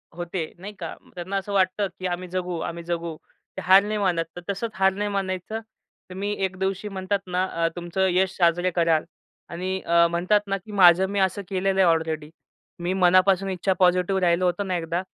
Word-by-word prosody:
होते 175 -1 -4
नाही 205 +3 -8
का. 165 -2 -5 0.2
त्यांना 185 +2 -5
असं 200 +1 -4
वाटतं, 195 +1 +2
की 185 - -5
आम्ही 180 +1 -4
जगू, 180 -2 -3
आम्ही 170 +1 -5
जगू. 170 -1 -3 0.4
ते - - -3
हार 190 +3 +6
नाही 210 +1 -2
मानत. 175 -4 +1
तर 175 - -7
तसंच 215 +3 -2
हार 190 0 +3
नाही 205 +1 -2
मानायचं. 195 +2 -3 0.5
तर - - -8
मी 200 +2 -2
एक 190 0 -5
दिवशी 195 +2 -2
म्हणतात 195 0 -2
ना, 180 +1 0
अ, 165 -1 -1
तुमचं 175 +2 -1
यश 190 +1 +1
साजरे 175 +1 +2
कराल 165 -2 +3 0.5
आणि 185 +2 -3
अ, 170 0 +5
म्हणतात 185 +5 +2
ना, 195 0 0
की 210 +3 -13
माझं 185 -1 +6
मी 200 0 -1
असं 190 +1 +1
केलेलं 195 0 0
आहे 185 - +5
ऑलरेडी. 160 -2 -3 0.5
मी 175 +2 -1
मनापासून 185 +1 +4
इच्छा 190 +1 0
पॉझिटिव्ह 185 +1 +3
राहिलो 175 +1 +2
होतो 180 +3 0
ना 185 -2 -2
एकदा. 170 +1 -2
185 Hz, 200 wpm, -24 LUFS, 175-195 Hz, 0.5 s, हार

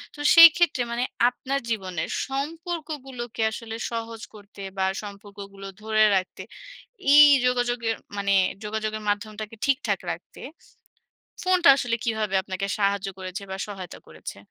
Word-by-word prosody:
তো - - -14 0.2
সেইক্ষেত্রে 335 -4 +7
মানে 240 +1 -1 0.3
আপনার 270 +2 -3
জীবনের 185 -7 -3 0.2
সম্পর্কগুলোকে 280 -5 -5
আসলে 225 0 -7 0.2
সহজ 230 -1 -5
করতে 205 -1 -13 0.2
বা, 190 - +1 0.2
সম্পর্কগুলো 200 -1 -10
ধরে 215 0 +2
রাখতে 185 -1 -2 0.7
এই 295 0 +10 0.2
যোগাযোগের 245 -2 0 0.2
মানে 200 0 +1 0.3
যোগাযোগের 215 0 -3
মাধ্যমটাকে 215 +1 -4
ঠিকঠাক 275 0 0
রাখতে, - - -10 1.0
ফোনটা 365 -4 +3
আসলে 245 -3 -1
কীভাবে 220 -3 -1
আপনাকে 190 0 -4
সাহায্য 200 -1 0
করেছে 185 +2 -6
বা, 190 - -4
সহায়তা 190 -4 -8
করেছে? - - -9
220 Hz, 120 wpm, -25 LUFS, 200-260 Hz, 1.0 s, এই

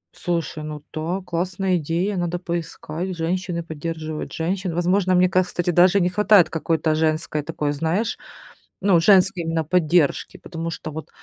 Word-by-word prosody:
Слушай, 165 -3 -3
ну 150 -1 -7
да, 170 +4 -2
классная 180 +2 -1
идея, 170 +6 -1
надо 175 0 -1
поискать: 170 0 -4
"Женщины 170 +1 -2
поддерживают 160 -1 -5
женщин". 180 +1 -2
Возможно, 185 +2 +2
мне, 180 0 +5
ка 185 0 +3
кстати, 175 -1 -2
даже 180 +3 +5
не 180 - +2
хватает 205 -2 +4
какой-то 160 -1 0
женской 155 -1 0
такой, 150 -1 -2
знаешь, 165 +10 -1 0.6
ну, 190 -3 +4
женской 185 0 +4
именно 165 0 -1
поддержки, 165 -2 +1
потому 165 -1 -6
что 160 -1 -6
вот 160 +1 -7
170 Hz, 150 wpm, -22 LUFS, 160-185 Hz, 0.6 s, мне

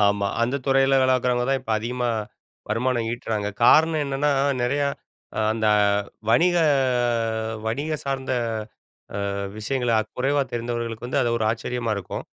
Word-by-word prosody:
ஆமா. 100 0 +1 0.2
அந்த 125 +4 +1
துறையில 135 0 +4
வேலைக்கிறவங்க 125 -1 +2
தான் 135 - +2
இப்ப 115 - -8
அதிகமா 125 +2 -2 0.6
வருமானம் 120 +1 0
ஈட்டுறாங்க. 110 -4 -2 0.2
காரணம் 160 +3 +5
என்னன்னா, 140 +1 0 0.3
நெறையா 140 +3 +1 0.5
அ - - +2
அந்த 110 -1 -1 0.6
வணிக 175 +9 +4 1.1
வணிக 145 +8 -1
சார்ந்த 135 -1 -2 1.0
அ - - -3 0.2
விஷயங்கள 125 +2 -1 0.3
குறைவா 140 +3 +2
தெரிந்தவர்களுக்கு 120 -1 -3
வந்து 130 - 0
அது 120 - +1
ஒரு 110 - -1
ஆச்சரியமா 115 0 -3
இருக்கும். 100 -3 -5
125 Hz, 125 wpm, -24 LUFS, 115-135 Hz, 1.1 s, காரணம்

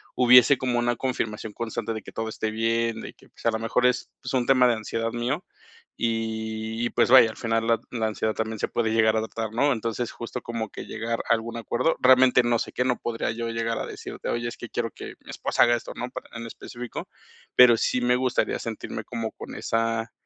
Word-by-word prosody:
hubiese 125 +2 +7
como 125 -2 0
una 120 0 0
confirmación 110 -4 -3
constante 115 0 -3
de 110 - -5
que - - -11
todo 110 - -3
esté 110 0 -3
bien, 115 +1 0
de - - -8
que, - - -22
pues, - - -17
a 115 - +4
lo 110 - -2
mejor 115 +2 +1
es, 125 0 +1
pues, - - -5
un 125 -2 +2
tema 130 -1 +5
de 120 - +4
ansiedad 115 +1 -3
mío 125 +9 -2 0.6
y 110 -1 -2 0.2
y, - - 0
pues, - - +2
vaya, 130 -3 +9
al 110 - -8
final 115 0 0
la 115 -1 +3
la 115 -3 -1
ansiedad 110 0 -1
también 110 0 -3
se - - 0
puede 115 -2 0
llegar 110 -1 +4
a - - +3
adoptar, 110 0 -4
¿no?, 140 +5 +2
entonces 115 +1 -3
justo 120 +1 -6
como 115 -2 -4
que - - -8
llegar 115 +1 -3
a - - +6
algún 115 +1 -3
acuerdo, 120 +7 0
realmente 130 0 +6
no 120 0 +2
sé - - -4
qué, 125 - -1
no 125 -1 +1
podría 115 -1 -2
yo, 115 +1 -4
llegar 115 0 -1
a - - -3
decirte: - - -7
"Oye, 120 0 -1
es 120 - -6
que 120 - -8
quiero 115 -2 -2
que - - -9
mi - - -16
esposa - - +2
haga 120 0 +4
esto", 120 - -6
¿no?, 125 - -4
para - - -9
en 115 - -6
específico, 120 +1 -8 0.5
pero 125 -2 +8
sí 125 - +1
me 125 0 +3
gustaría 125 0 0
sentirme 115 -1 -5
como 115 -2 -4
con - - -9
esa 115 0 -1
115 Hz, 230 wpm, -25 LUFS, 110-125 Hz, 0.6 s, vaya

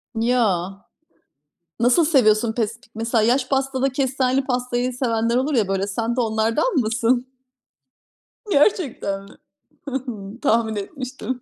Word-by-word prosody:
Ya. 225 -6 +1 1.1
Nasıl 250 +7 +4
seviyorsun 220 -6 +3
pesk 225 0 -2 0.2
mesela 225 0 0
yaş 250 +3 +2
pastada 270 0 0
kestaneli 265 0 0
pastayı 250 -1 -1
sevenler 230 -2 0
olur 270 +3 +1
ya, 215 -5 +2
böyle. 195 +1 -1
Sen 230 +3 -2
de 250 - +1
onlardan 225 - +1
mısın? 245 +2 +1 1.2
Gerçekten 280 - +1
mi? 200 - -15 0.6
Hı 280 - -6
hı, 240 -4 -6
tahmin 225 -5 +2
etmiştim. 255 +3 -5
240 Hz, 120 wpm, -22 LUFS, 220-260 Hz, 1.2 s, Nasıl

